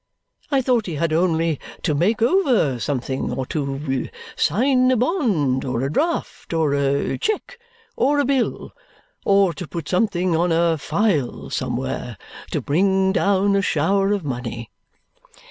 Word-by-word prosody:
I 275 -3 +2
thought 245 -4 +1
he 170 - -4
had 155 +1 0
only 165 -2 +1 0.2
to 155 - +1
make 210 +10 +1
over 240 - +2
something, 130 0 -2
or 130 - -3
to 135 -2 -3 0.3
sign 255 +2 +2
a 255 - +3
bond, 210 - +1
or 125 -1 -2
a 135 - -1
draft, 325 - -2
or 155 -3 +2
a 140 0 0
cheque, 455 +2 -2 0.4
or 290 +2 +2
a 285 - +2
bill, 265 -2 -1 0.5
or 195 -3 +4
to 170 +2 -7
put 165 -2 -6
something 180 -3 +1
on 170 +2 +1
a 165 -1 +2
file 155 - -1
somewhere, - - -3 0.3
to - - -2
bring 190 +5 +2
down 200 0 +2
a 200 - +3
shower 195 +4 +1
of 205 -3 0
money." 120 -3 -5
175 Hz, 145 wpm, -21 LUFS, 145-225 Hz, 0.5 s, or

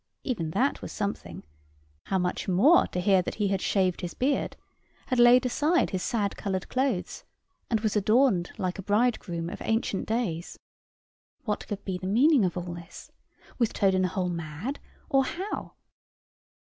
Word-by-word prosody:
Even 195 - -2
that 260 - 0
was - - -7
something: 200 - -4 0.6
how 190 - 0
much 180 -1 -2
more, 210 - +5
to 180 - -4
hear 190 0 +4
that - - -5
he 205 -2 0
had 195 -1 0
shaved 185 -2 +1
his 175 -2 -5
beard 275 +3 0 0.5
had 255 -2 -1
laid 240 +1 +7
aside 305 +7 +2
his 185 - -2
sad 205 -2 -1
colored 190 -2 -3
clothes, 265 +1 -1 0.5
and 225 -2 +1
was 215 -1 0
adorned 215 -3 +3
like 185 +1 -2
a - - -2
bridegroom 205 -5 0
of 185 - -7
ancient 225 -3 -1
days. 205 -8 -2 0.9
What 210 -4 -3
could 200 -1 -5
be 185 -2 -3
the 185 - -5
meaning 255 +5 +4
of 180 -1 -1
all 175 -1 -4
this? 170 0 -11 0.5
Was 235 -3 +3
Toad 195 -1 +2
in 185 - +2
the 185 - +2
hole 180 -1 -2
mad? 170 - -5 0.3
or 270 0 +3
how? 380 +9 -5
200 Hz, 170 wpm, -27 LUFS, 180-245 Hz, 0.9 s, laid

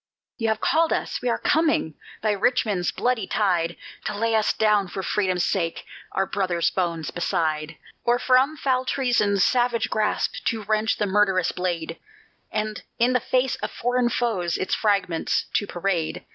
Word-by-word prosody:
You 225 - 0
have 220 -1 0
called 325 0 +2
us, - - -1
and 250 - 0
we're 235 - +1
coming, 305 - +1 0.3
by 215 - +2
Richmond's 205 -3 +1
bloody 245 -5 -1
tide 175 -5 0 0.3
To - - -2
lay 225 +1 +1
us 220 -1 +3
down, 210 -3 +2
for 190 +2 -5
Freedom's 185 -3 0
sake, 165 -4 -1 0.3
our 195 - +1
brothers' 185 -4 0
bones 170 -4 -2
beside, 160 -3 -1 0.3
Or 240 0 +3
from 260 +5 +3
foul 260 -2 +1
treason's 240 -7 +1
savage 240 -2 +1
grasp 215 -1 -1
to 225 -2 -1
wrench 215 +1 +1
the 210 - 0
murderous 190 -3 +2
blade, 170 -2 -3 0.5
And 215 0 -2 0.2
in 245 +2 +3
the 250 - +3
face 255 +2 0
of - - -4
foreign 245 0 0
foes 215 -9 0
its 185 - -2
fragments 200 -6 +1
to 205 - +1
parade. 175 -3 -2
210 Hz, 160 wpm, -24 LUFS, 180-240 Hz, 0.5 s, us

